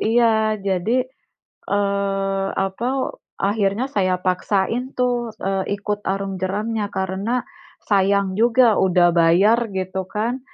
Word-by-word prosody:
iya, 220 Hz, -1 st, +2 dB
jadi, 200 Hz, +6 st, 0 dB, 0.6 s
eee, 195 Hz, -1 st, 0 dB
apa, 195 Hz, +6 st, -1 dB, 0.5 s
akhirnya 205 Hz, +4 st, +1 dB
saya 185 Hz, -4 st, +1 dB
paksain 200 Hz, +7 st, -1 dB
tuh, 245 Hz, -2 st, 0 dB
eee, 195 Hz, +1 st, -1 dB
ikut 205 Hz, 0 st, -3 dB
arung 195 Hz, 0 st, -2 dB
jeramnya. 210 Hz, +3 st, -2 dB
Karena 195 Hz, +6 st, -2 dB, 0.5 s
sayang 195 Hz, -1 st, +2 dB
juga 235 Hz, -1 st, +4 dB
udah 180 Hz, -2 st, +4 dB
bayar 195 Hz, +8 st, +4 dB
gitu 185 Hz, 0 st, -3 dB
kan, 230 Hz, +6 st, -2 dB
200 Hz, 110 wpm, -21 LUFS, 190-225 Hz, 0.6 s, juga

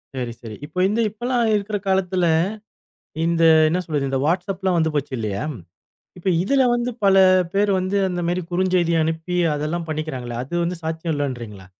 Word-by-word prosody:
சரி, 125 Hz, -2 st, -3 dB
சரி. 110 Hz, -3 st, -8 dB
இப்ப 160 Hz, +5 st, -3 dB
இந்த 215 Hz, +3 st, 0 dB
இப்பலாம் 240 Hz, +1 st, 0 dB
இருக்குற 205 Hz, 0 st, -1 dB
காலத்துல, 190 Hz, -1 st, +1 dB, 1.0 s
இந்த 165 Hz, 0 st, +2 dB, 0.2 s
என்ன 170 Hz, +3 st, 0 dB
சொல்றது, 145 Hz, -4 st, -2 dB
இந்த 135 Hz, -, -1 dB
வாட்ஸ்அப்லாம் 185 Hz, +2 st, 0 dB
வந்து 160 Hz, -1 st, +1 dB
போச்சு 145 Hz, -2 st, -2 dB
இல்லையா? 105 Hz, 0 st, -3 dB, 0.7 s
இப்ப 180 Hz, -, -3 dB
இதுல 265 Hz, +7 st, +2 dB
வந்து 240 Hz, +1 st, -1 dB
பல 195 Hz, -1 st, +5 dB, 0.4 s
பேரு 205 Hz, +1 st, +2 dB
வந்து 185 Hz, +2 st, 0 dB
அந்த 175 Hz, -1 st, -3 dB
மாரி 175 Hz, +1 st, 0 dB
குறுஞ்செய்தி 180 Hz, -2 st, +2 dB
அனுப்பி 160 Hz, +3 st, -2 dB, 0.2 s
அதெல்லாம் 160 Hz, +3 st, -3 dB
பண்ணிக்கிறாங்களே 130 Hz, -6 st, -4 dB
அது 140 Hz, -, -8 dB
வந்து 175 Hz, +1 st, -2 dB
சாத்தியம் 160 Hz, 0 st, -2 dB
இல்லன்றீங்களா? 120 Hz, -9 st, -5 dB
170 Hz, 160 wpm, -22 LUFS, 145-190 Hz, 1.0 s, பல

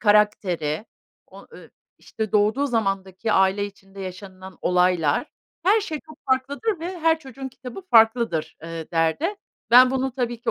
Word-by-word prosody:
karakteri, 205 Hz, -5 st, +2 dB, 0.4 s
o -, -, -14 dB
ııı, -, -, -12 dB
i -, -, -27 dB, 0.3 s
işte, 220 Hz, -2 st, -5 dB
doğduğu 215 Hz, +7 st, +2 dB
zamandaki 195 Hz, -3 st, -1 dB
aile 190 Hz, +1 st, +3 dB
içinde 195 Hz, -1 st, -11 dB
yaşanılan 185 Hz, 0 st, -9 dB
olaylar, 180 Hz, -, +2 dB, 0.4 s
her 415 Hz, +5 st, +4 dB
şey 315 Hz, -7 st, -5 dB
çok 310 Hz, -2 st, -15 dB
farklıdır 285 Hz, -, 0 dB
ve 355 Hz, +1 st, -5 dB
her 325 Hz, 0 st, +3 dB
çocuğun 270 Hz, -2 st, -8 dB
kitabı 255 Hz, +7 st, -10 dB
farklıdır." 225 Hz, -7 st, +3 dB
eee, 165 Hz, -1 st, -7 dB
derdi. 165 Hz, -, +1 dB, 0.4 s
Ben 250 Hz, +1 st, +8 dB
bunu 265 Hz, -1 st, -1 dB
tabii 240 Hz, -2 st, -3 dB
ki -, -, -1 dB
220 Hz, 150 wpm, -23 LUFS, 190-265 Hz, 0.4 s, Ben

